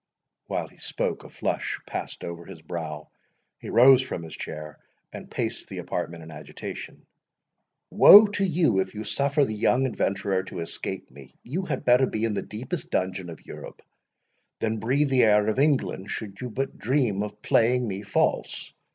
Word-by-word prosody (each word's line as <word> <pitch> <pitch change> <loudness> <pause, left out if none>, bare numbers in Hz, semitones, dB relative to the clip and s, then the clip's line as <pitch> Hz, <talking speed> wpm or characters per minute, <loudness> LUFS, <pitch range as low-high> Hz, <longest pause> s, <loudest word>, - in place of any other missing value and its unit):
While - - -2
he - - -21
spoke, - - -3
a - - -12
flush - - -2
passed - - -6
over 85 0 -6
his - - -11
brow, 75 -3 -6 0.5
he - - -8
rose 130 +1 +7
from 110 -10 -5
his 80 -2 -8
chair, 75 -1 -7 0.3
and - - -9
paced - - -3
the - - -7
apartment 85 0 -4
in 80 - -11
agitation. 75 -1 -8 0.9
"Woe 210 +2 +10
to 205 -1 -2
you, 165 - +2
if 95 +2 -2
you 105 - -4
suffer 140 +4 +1
the 110 - -4
young 125 +5 +2
adventurer 100 -5 0
to 85 - -6
escape 85 - -5
me!—you 70 - -7
had 135 -6 -3
better 125 +1 +5
be 110 +1 -1
in 110 - -1
the 100 - -1
deepest 130 - -6
dungeon 95 -1 -2
in 80 - -8
Europe, - - -10 0.8
than 110 0 -1
breathe 135 +6 +1
the 130 -1 +4
air 105 -1 +4
of 110 +4 0
England, 135 -9 +1
should 100 -1 -6
you 125 - -4
but 135 +4 -4
dream 120 -5 +1
of 105 0 -6
playing 120 +1 +3
me 100 -1 -4
false. 100 -1 -1
110 Hz, 175 wpm, -26 LUFS, 95-130 Hz, 0.9 s, Woe